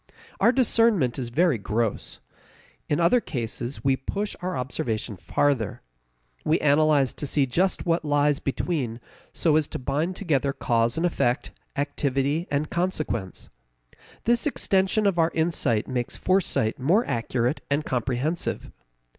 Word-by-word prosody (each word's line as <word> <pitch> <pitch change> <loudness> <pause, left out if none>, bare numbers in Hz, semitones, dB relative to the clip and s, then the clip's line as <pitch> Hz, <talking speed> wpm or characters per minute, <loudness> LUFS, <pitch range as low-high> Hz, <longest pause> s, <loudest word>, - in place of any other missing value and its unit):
Our 230 - +5
discernment 230 - +2
is 120 -2 -3
very 150 -1 +2
gross. 105 +2 -2 0.7
In 145 - +1
other 175 +9 +4
cases 120 - -4
we 135 -1 +3
push 200 - -4
our 180 0 -2
observation 115 -4 -3
farther. 125 +3 0 0.6
We 160 - +2
analyze 145 -2 +3
to 145 - -5
see 140 0 +2
just 180 +9 0
what 170 -1 +1
lies 145 -1 +2
between 135 -5 -2 0.3
so 160 -3 +2
as 155 -2 +1
to - - -5
bind 150 +7 -1
together 145 -7 0
cause 115 0 +1
and 165 - +1
effect, 125 -6 0 0.2
activity 140 +2 -1
and 145 +1 -1
consequence. 155 - -2 0.7
This 235 +4 +2
extension 195 -5 +1
of 190 -4 +2
our 165 0 +4
insight 160 -9 +1
makes 125 -2 -3
foresight 185 - +1
more 180 - +3
accurate 120 +3 -1
and 145 +2 0
comprehensive. 130 +6 -2
145 Hz, 135 wpm, -25 LUFS, 125-170 Hz, 0.7 s, Our